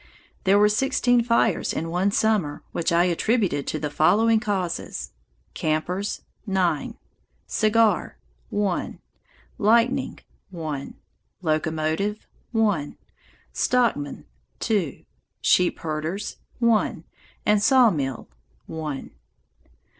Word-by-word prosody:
There 195 +1 +5
were 210 0 +6
sixteen 245 +1 +2
fires 230 -4 +2
in 165 +1 -3
one 180 +3 +2
summer, 200 -8 +1
which 170 - -1
I 170 +1 +4
attributed 180 - +1
to - - -1
the 150 -1 -3
following 210 +10 +4
causes: 185 - -3 0.4
campers, 180 +6 -2 0.3
nine; 180 -6 0 0.5
cigar, 215 - +2 0.3
one; 205 -3 -1 0.6
lightning, 235 +5 +2 0.3
one; 155 -6 -5 0.5
locomotive, 160 +5 -1 0.3
one; 205 -10 0 0.6
stockmen, 235 - 0 0.3
two; 200 - -1 0.3
sheep 180 -1 +3
herders, 160 +6 -3 0.2
one; 235 -2 +1 0.4
and 210 -1 +4
sawmill, 200 - +3 0.4
one. 155 -4 -5
190 Hz, 90 wpm, -24 LUFS, 155-220 Hz, 0.6 s, were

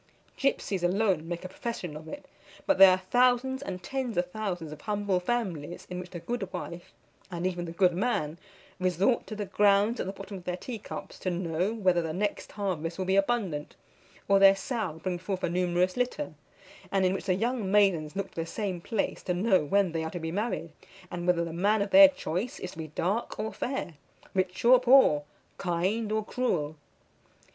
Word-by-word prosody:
Gipsies 210 -8 0
alone 180 -3 +1
make 175 +1 -5
a - - -2
profession 185 -4 -5
of 155 +1 -9
it; 290 - -8 0.4
but 290 - +2
there 195 0 +11
are 185 0 +1
thousands 250 +1 +3
and 185 -9 -6
tens 255 -3 -3
of 175 0 0
thousands 180 -7 -4
of 150 -1 -9
humble 205 -3 0
families 180 -7 -3
in 180 - -3
which 180 0 -8
the 175 - -7
good 195 -1 -4
wife, 175 -1 -7 0.4
and 175 -1 -4
even 175 -1 -1
the 165 - -6
good 180 +1 +3
man, 175 -6 -1 0.4
resort 185 +6 +1
to 215 - -6
the 205 -1 -3
grounds 205 +3 +3
at - - -2
the - - -2
bottom 195 0 -8
of 180 - -12
their 180 0 -2
tea 230 +4 -6
cups, - - -8
to 185 - -2
know 175 +2 -1
whether 185 -6 +2
the 160 -1 -3
next 205 +4 -2
harvest 180 -5 -3
will 190 - -2
be 190 +1 +2
abundant, 195 -8 0 0.5
or 195 -1 +5
their 195 0 +8
sow 205 -2 -3
bring 180 -2 -2
forth 185 +1 -4
a - - +1
numerous 180 +1 +1
litter; 250 +4 -2 0.6
and 195 -1 +2
in 185 - +3
which 195 - -4
the 185 -2 +2
young 230 0 -1
maidens 190 -6 +3
look 195 -1 -3
to 165 - -4
the - - -3
same 190 -3 -3
place 215 +2 -2
to 180 - -2
know 190 -2 +3
when 195 +4 +2
they 165 -1 -2
are 160 - -3
to 175 - -5
be 160 0 -4
married, 200 -4 -2 0.4
and 175 0 -4
whether 170 -1 +3
the 165 - -6
man 205 +5 +2
of 200 0 -1
their 290 0 +10
choice 230 - -4
is 180 - -5
to - - -12
be 160 - -4
dark 185 +9 -2
or 215 +1 -3
fair, 250 -9 -3 0.4
rich 185 +2 -1
or 250 +1 +8
poor, 250 - +5 0.3
kind 190 +5 -1
or 215 -1 0
cruel. 160 -14 -1
190 Hz, 205 wpm, -28 LUFS, 175-215 Hz, 0.6 s, there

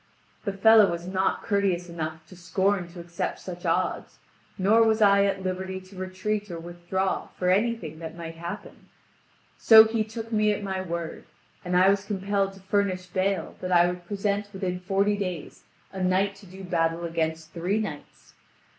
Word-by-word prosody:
The 200 - -1
fellow 215 0 +6
was 170 0 -4
not 190 +1 0
courteous 195 -4 0
enough 160 -2 -5
to 185 - -14
scorn 185 +2 0
to 175 +1 -12
accept 170 0 -4
such 175 -1 -7
odds, - - -1 0.4
nor 210 +4 +4
was 220 0 +3
I 200 -1 +5
at 195 -1 -1
liberty 190 0 -3
to 185 +1 -16
retreat 190 +3 -3
or 170 - -5
withdraw 175 +3 -2
for 180 0 +2
anything 195 -6 0
that 165 0 -7
might 165 -1 -6
happen. 170 +1 -8 0.7
So 220 -1 +9
he 220 0 0
took 225 +1 -7
me 215 -1 +3
at 205 - -5
my 190 -1 -2
word, 170 -2 -5 0.4
and 180 0 0
I 185 +1 +6
was 200 0 +2
compelled 195 -1 -1
to 195 - -15
furnish 190 -1 0
bail 185 -1 -1
that 185 - -3
I 175 -1 +6
would 175 0 -4
present 205 +1 -2
within 185 -2 -3
forty 195 +2 +1
days 180 -6 -5 0.3
a 190 - -5
knight 190 +2 +2
to 200 -1 -15
do 190 +2 -11
battle 165 -1 0
against 160 -1 -2
three 180 +5 -1
knights. 160 -9 -7
190 Hz, 175 wpm, -26 LUFS, 175-200 Hz, 0.7 s, So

